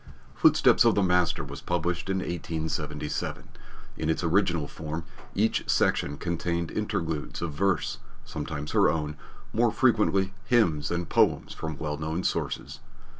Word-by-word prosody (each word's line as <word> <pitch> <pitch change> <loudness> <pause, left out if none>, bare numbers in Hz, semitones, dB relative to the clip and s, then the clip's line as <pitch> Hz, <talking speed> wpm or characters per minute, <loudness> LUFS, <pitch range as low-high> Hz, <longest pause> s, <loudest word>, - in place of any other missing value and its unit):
Footsteps - - +5
of - - +4
the 100 - +3
Master 90 -2 +2
was - - -8
published 90 +1 -1
in 95 - +1
1877. 80 -4 -3 0.5
In 80 - -1
its 80 - 0
original 85 -3 +2
form, 80 +2 -5 0.3
each 110 +3 +1
section 70 - +2
contained 85 0 -2
interludes 85 -8 -2
of 80 -3 -3
verse, 95 +2 0 0.3
sometimes 75 -1 -5
her - - +4
own, 75 -2 -2 0.4
more - - +3
frequently 95 -1 +2
hymns 85 -12 +2
and 85 -1 -2
poems - - +2
from 80 -2 -5
well 75 -1 -3
known 80 +4 -2
sources. - - -2
85 Hz, 135 wpm, -27 LUFS, 75-90 Hz, 0.5 s, Footsteps